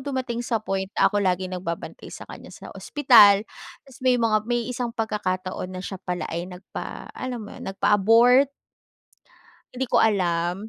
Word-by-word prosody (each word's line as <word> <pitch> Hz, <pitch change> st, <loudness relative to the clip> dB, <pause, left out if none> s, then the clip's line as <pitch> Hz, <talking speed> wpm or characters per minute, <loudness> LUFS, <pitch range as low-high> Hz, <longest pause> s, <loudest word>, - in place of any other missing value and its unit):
dumating 260 Hz, -3 st, -3 dB
sa 235 Hz, -1 st, -1 dB
point 195 Hz, -3 st, -3 dB
na -, -, +3 dB
ako 205 Hz, -1 st, +2 dB
laging 185 Hz, -1 st, -1 dB
nagbabantay 175 Hz, -2 st, -6 dB
sa -, -, -9 dB
kanya -, -, -11 dB
sa -, -, -11 dB
ospital. 215 Hz, -8 st, +5 dB, 0.4 s
Tas 270 Hz, -2 st, -17 dB
may 255 Hz, -1 st, +3 dB
mga 220 Hz, -2 st, +2 dB
may 240 Hz, -1 st, 0 dB
isang 245 Hz, -1 st, -3 dB
pagkakataon 185 Hz, -4 st, -3 dB
na 185 Hz, -, -6 dB
siya 190 Hz, -1 st, -7 dB
pala 180 Hz, -1 st, -4 dB
ay 170 Hz, +2 st, -4 dB
nagpa 180 Hz, +1 st, -9 dB
alam 250 Hz, -4 st, -5 dB
mo 205 Hz, -, -11 dB
'yun, -, -, -8 dB
nagpa-abort. 230 Hz, +7 st, +4 dB, 1.3 s
Hindi 260 Hz, +1 st, -2 dB
ko -, -, +3 dB
alam. 180 Hz, -1 st, 0 dB
210 Hz, 165 wpm, -24 LUFS, 185-240 Hz, 1.3 s, ospital